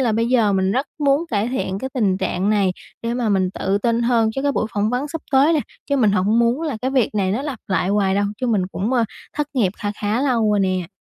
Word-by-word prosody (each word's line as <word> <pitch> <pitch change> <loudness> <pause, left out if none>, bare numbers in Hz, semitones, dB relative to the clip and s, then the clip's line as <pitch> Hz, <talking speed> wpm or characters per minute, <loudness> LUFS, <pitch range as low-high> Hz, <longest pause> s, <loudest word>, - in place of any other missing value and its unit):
là 240 -4 +2
bây 230 +2 +1
giờ 230 -5 +3
mình 190 0 +1
rất 265 +5 0
muốn 285 +2 +2
cải 215 0 0
thiện 220 -7 -2
cái 265 +5 -5
tình 205 -7 +2
trạng 190 +2 0
này 200 -3 +2 0.3
để 230 +1 -2
mà 240 -2 -1
mình 190 -3 +1
tự 195 +1 -1
tin 230 +2 +1
hơn 230 -2 +2
chứ 270 - -2
cái 285 0 +1
buổi 225 - 0
phỏng 210 +1 0
vấn 250 +4 -2
sắp 325 +1 -5
tới 275 +4 +5
nè. 310 - +2 0.3
Chứ 280 - +1
mình 225 -6 +4
hổng 205 +3 +2
muốn 235 +6 +2
là 300 -7 -2
cái 260 - 0
việc 255 -6 +1
này 190 -2 +1
nó 235 +6 -1
lặp 285 -5 -4
lại 190 -1 0
hoài 195 -1 +2
đâu 200 +1 +1 0.2
chứ 255 - 0
mình 215 -5 +2
cũng, 210 +7 -2
ơ, 240 -3 +3 0.3
thất 295 0 0
nghiệp 210 -8 +2
kha 205 - -3
khá 210 +3 0
lâu 235 -6 +2
rồi 205 -1 +2
nè. 185 -2 0
225 Hz, 275 wpm, -21 LUFS, 200-260 Hz, 0.3 s, tới